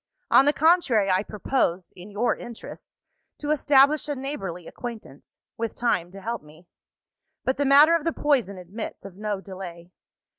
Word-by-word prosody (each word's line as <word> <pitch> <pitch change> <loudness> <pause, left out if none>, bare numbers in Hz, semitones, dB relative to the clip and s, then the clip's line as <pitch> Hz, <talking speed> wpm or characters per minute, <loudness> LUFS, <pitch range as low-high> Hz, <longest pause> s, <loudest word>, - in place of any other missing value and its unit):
On 270 - +7
the 290 - +5
contrary, 285 - +3
I 185 +1 +3
propose 205 -4 -1
(in 180 +3 -11
your 210 +4 0
interests) 235 -2 -11 0.4
to 295 0 -3
establish 290 0 +4
a 290 - -1
neighbourly 195 - -5
acquaintance 230 - -9 0.2
with 230 -1 -3
time 180 -8 0
to 195 +2 -11
help 230 +2 -4
me. 155 +3 -18 0.8
But 260 - 0
the 285 - +1
matter 290 +4 +7
of 330 - -1
the 330 - 0
poison 260 -12 0
admits 185 +4 -8
of 195 -2 -10
no 210 0 -3
delay. 180 -3 -9
225 Hz, 160 wpm, -25 LUFS, 185-275 Hz, 0.8 s, On